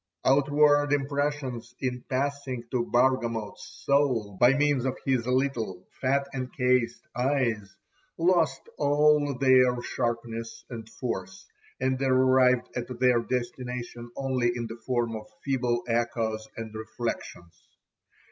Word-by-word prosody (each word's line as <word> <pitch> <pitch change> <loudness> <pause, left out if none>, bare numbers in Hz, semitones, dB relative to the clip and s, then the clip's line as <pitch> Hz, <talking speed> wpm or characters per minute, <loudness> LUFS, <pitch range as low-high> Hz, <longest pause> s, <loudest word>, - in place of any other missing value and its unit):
Outward 145 +1 +4
impressions 140 -4 -2
in 125 -1 -2
passing 135 -2 -2
to 120 -2 0
Bargamot's 120 -4 0
soul 130 -8 +2
by 125 +7 +5
means 145 -3 +2
of 130 -1 -1
his 130 -3 +1
little 125 -8 -1 0.2
fat 140 +1 +1
encased 125 -2 0
eyes, 120 -6 0 0.4
lost 165 -6 +2 0.2
all 145 -1 +3
their 125 -2 +4
sharpness 115 -1 -3
and 115 -2 -7
force, 95 -6 -5 0.3
and 130 0 0
arrived 130 -1 +4
at 125 -1 -3
their 125 -2 +4
destination 120 -1 -4
only 130 -3 0
in 120 -1 -3
the 115 +1 -8
form 120 -3 0
of 110 -1 -7 0.2
feeble 125 -3 0
echoes 115 -2 -1
and 110 -1 -6
reflexions. 110 -6 -6
125 Hz, 115 wpm, -27 LUFS, 115-135 Hz, 0.4 s, by